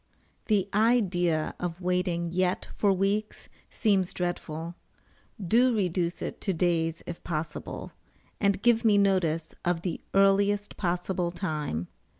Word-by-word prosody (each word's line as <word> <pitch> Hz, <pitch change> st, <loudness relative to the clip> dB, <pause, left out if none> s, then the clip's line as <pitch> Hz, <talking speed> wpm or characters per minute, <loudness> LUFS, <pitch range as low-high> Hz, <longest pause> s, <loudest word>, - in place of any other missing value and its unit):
The 200 Hz, -4 st, +2 dB
idea 190 Hz, -8 st, +2 dB
of 175 Hz, -1 st, -4 dB
waiting 180 Hz, -2 st, 0 dB
yet 180 Hz, +1 st, 0 dB
for 205 Hz, -, +3 dB
weeks 200 Hz, +3 st, -1 dB, 0.2 s
seems 195 Hz, -5 st, +1 dB
dreadful; 170 Hz, -2 st, -3 dB, 0.7 s
do 235 Hz, +6 st, +3 dB
reduce 180 Hz, -3 st, -1 dB
it -, -, -5 dB
to 195 Hz, -, 0 dB
days 165 Hz, -1 st, 0 dB
if 170 Hz, -, -7 dB
possible, 155 Hz, -2 st, -5 dB, 0.5 s
and 200 Hz, 0 st, +1 dB
give 235 Hz, -1 st, +4 dB
me 215 Hz, -3 st, +5 dB
notice 175 Hz, -5 st, +1 dB
of 175 Hz, -1 st, 0 dB
the 180 Hz, -, -3 dB
earliest 200 Hz, +1 st, +3 dB
possible 180 Hz, -1 st, -1 dB
time. 150 Hz, -, -3 dB
180 Hz, 125 wpm, -28 LUFS, 170-200 Hz, 0.7 s, me